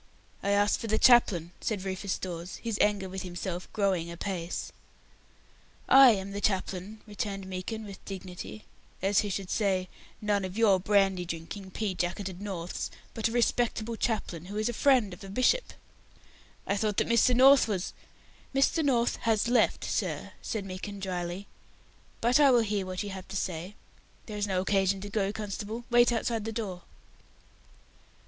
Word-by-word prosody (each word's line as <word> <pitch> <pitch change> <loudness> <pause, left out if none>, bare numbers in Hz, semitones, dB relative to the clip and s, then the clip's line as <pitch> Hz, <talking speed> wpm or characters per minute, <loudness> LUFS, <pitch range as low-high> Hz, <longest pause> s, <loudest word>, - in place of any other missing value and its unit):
"I 200 - -1
asked 205 0 +3
for 230 - -4
the 220 0 +2
chaplain," 205 -9 +5
said 205 -4 -2
Rufus 190 0 -2
Dawes, 175 0 -6
his 230 -3 -4
anger 205 -2 +2
with 190 0 -5
himself 180 0 -5
growing 190 -5 0
apace. 170 0 -4 1.2
"I 270 -1 +9
am 195 -1 -4
the 200 +1 -4
chaplain," 195 +1 -2
returned 205 -2 -4
Meekin, 190 +4 -5
with 200 -2 -10
dignity, 190 +2 -8 0.4
as 195 +1 +3
who 205 - 0
should 190 -1 -4
say 190 -4 +1 0.3
"none 205 -2 0
of 185 +2 -5
your 205 -5 +5
brandy 195 -1 +2
drinking, 170 +3 -6
pea 200 +1 -2
jacketed 185 +1 -3
Norths, 180 -4 -4 0.2
but 225 0 0
a - - -4
Respectable 235 -1 +1
chaplain 210 -8 -2
who 200 +3 -6
is 215 - 0
the 240 - 0
friend 245 -6 +3
of 180 - -11
a 195 - -8
Bishop!" 255 - +2 0.9
"I 200 - 0
thought 210 -1 0
that - - +3
Mr. 235 +2 +4
North 270 +1 +7
was 195 -4 -2 0.3
" - - -25
"Mr. 275 +4 +3
North 245 -4 +2
has 225 -1 +1
left, 245 +1 +2
sir," - - -2
said 210 -3 -3
Meekin, 195 +2 -6
dryly, 180 0 -4 0.8
"but 240 +4 +4
I 285 -2 +7
will 245 -2 +5
hear 205 -3 -1
what 185 +1 -3
you 205 - -5
have 190 -1 -8
to 195 - -8
say. 180 +2 -4 0.5
There 215 - -7
is 205 0 -1
no 185 -2 0
occasion 195 0 +1
to 205 - -6
go, 200 -1 0
constable; 215 +2 -5
wait 240 0 +6
outside 230 -1 -1
the 225 - -2
door." 205 -6 -4
200 Hz, 170 wpm, -29 LUFS, 185-220 Hz, 1.2 s, I